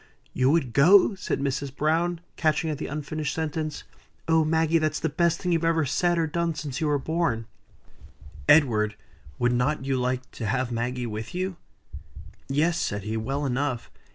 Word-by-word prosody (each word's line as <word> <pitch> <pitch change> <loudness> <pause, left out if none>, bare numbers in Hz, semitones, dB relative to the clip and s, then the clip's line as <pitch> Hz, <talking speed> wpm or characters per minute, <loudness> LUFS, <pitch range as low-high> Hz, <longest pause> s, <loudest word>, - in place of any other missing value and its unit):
"You 130 +1 +2
would 140 -6 +1
go!" 185 - +6
said 195 -6 -3
Mrs. 140 0 -2
Browne, 165 +3 0
catching 155 0 +1
at 145 - -4
the - - -4
unfinished 150 0 -3
sentence. 155 -1 -3 0.4
"Oh! 160 -1 +4
Maggie, 160 +1 +2
that's 155 -1 0
the - - -1
best 170 +2 +1
thing 180 - -1
you've 165 -1 +1
ever 165 -2 +2
said 175 +5 +1
or 165 - +2
done 165 +1 -1
since 145 -3 -5
you 155 - +1
were 145 -1 +2
born. 150 -6 -1 1.0
Edward, 110 -8 +4 0.4
would 120 0 +2
not 135 +3 0
you 135 -1 0
like 125 +1 -2
to 115 - -5
have 125 +3 -1
Maggie 120 +1 -2
with 110 +5 -6
you?" 185 0 -2 0.9
"Yes," 160 +5 +1
said 100 -1 -2
he, 110 +1 -3
"well 135 +6 -2
enough. 130 -1 -2
150 Hz, 175 wpm, -26 LUFS, 130-165 Hz, 1.0 s, go